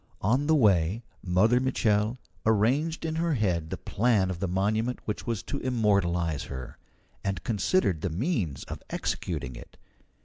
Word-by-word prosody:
On 125 +9 +2
the 160 - +5
way 100 - +3 0.2
Mother 100 +7 +3
Mitchel 115 -3 +1 0.3
arranged 130 +11 +2
in 160 0 -2
her 165 -2 +1
head 90 -8 0
the - - -3
plan 105 -4 +1
of 85 - -5
the 95 - -1
monument 110 +7 0
which 105 +3 -4
was 115 -5 -1
to 140 - -4
immortalize 100 - +1
her, 65 -2 -8 0.4
and 100 -2 -2
considered 105 - +1
the 95 - -1
means 90 - -1
of - - -7
executing 65 0 -3
it. - - -12
105 Hz, 150 wpm, -28 LUFS, 90-125 Hz, 0.4 s, the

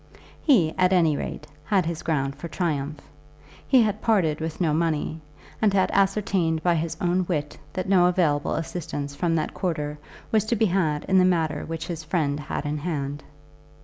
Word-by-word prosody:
He, 190 - +4
at 185 +1 +4
any 165 -5 +4
rate, 150 - -5 0.2
had 195 -4 +1
his 165 -1 -3
ground 140 -4 -1
for 150 +4 -7
triumph. 150 -4 -2 0.7
He 260 -3 +6
had 210 -1 -1
parted 175 -9 +2
with 160 0 -4
no 165 -4 +2
money, 160 0 -1 0.4
and 215 -2 +4
had 195 -1 +2
ascertained 190 -5 +1
by 175 - +3
his 165 0 -2
own 180 +1 +1
wit 150 -5 -2 0.2
that 185 -1 -3
no 185 -2 +5
available 160 -5 +1
assistance 145 -4 -4
from 165 +3 0
that 155 -1 -1
quarter 150 -5 -3 0.3
was 220 -2 +3
to 235 - +1
be 220 - +3
had 170 -6 +1
in 190 -1 +4
the - - +5
matter 160 -5 +1
which 165 0 -4
his 165 -3 -5
friend 150 -3 0
had 150 0 -4
in 150 +1 -2
hand. 145 -3 -3
165 Hz, 180 wpm, -25 LUFS, 150-185 Hz, 0.7 s, He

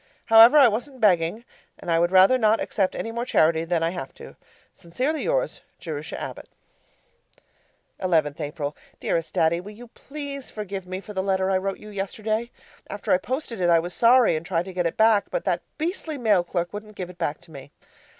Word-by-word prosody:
However, 225 +5 +8
I 275 -4 +8
wasn't 250 +5 -3
begging! 190 +1 +2 0.3
And 170 - -5
I 165 - +3
would 175 +1 +2
rather 190 +7 +6
not 220 -1 +3
accept 190 -3 -1
any 225 - -4
more 235 +1 -3
charity 160 -8 +2
than 165 -1 0
I 165 - +1
have 135 -7 -7
to. - - -12 0.4
Sincerely 260 - -3
yours, - - -1 0.2
Jerusha 155 -2 -6
Abbott - - -7 1.5
11th 160 -5 +1
April 145 -1 -4 0.2
Dearest 165 -1 -2
Daddy, 165 +2 +2
Will 205 +3 -10
you 240 +2 -13
please 280 0 -8
forgive 195 -3 -6
me 185 +1 -5
for 210 - -10
the 190 - -1
letter 190 0 0
I 190 - +2
wrote 195 0 -3
you 210 - -12
yesterday? 215 +3 -3 0.4
After 205 - -4
I 180 - +4
posted 255 -2 -4
it 175 - +2
I 170 - +6
was 175 +2 -3
sorry, 240 -4 +5
and 155 - -3
tried 170 -1 -1
to 190 - -8
get 180 -1 0
it 165 - -5
back, 220 -2 +4
but - - -3
that - - 0 0.2
beastly 315 -1 -3
mail 210 -8 +2
clerk 175 0 -3
wouldn't 210 0 -8
give 180 -2 -6
it 175 - -21
back 155 -3 -2
to - - -17
me. 140 -2 -11
195 Hz, 200 wpm, -24 LUFS, 170-230 Hz, 1.5 s, However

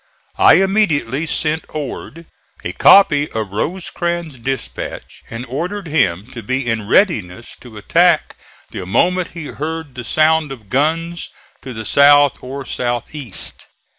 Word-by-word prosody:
I - - +7
immediately 165 - +1
sent 155 0 0
Ord 155 +3 -7 0.4
a - - -3
copy 150 -8 +5
of 110 -3 -3
Rosecrans' 170 - -3
dispatch 130 +1 -5
and 115 +2 -6
ordered 175 +10 -4
him 105 - 0
to 120 - -7
be 130 +1 -2
in 110 -3 -1
readiness 115 - +1
to 115 -4 -12
attack 170 - +2 0.4
the 90 - -6
moment 180 - +1
he 165 -3 -6
heard 155 0 -5
the 125 - -7
sound 155 +3 +2
of 110 -7 -10
guns 165 +6 -1 0.3
to 130 - -8
the 110 -2 -7
south 145 +1 +5
or 135 +2 -7
south 120 +1 -3
east. 135 -10 -5
145 Hz, 135 wpm, -18 LUFS, 120-165 Hz, 0.4 s, I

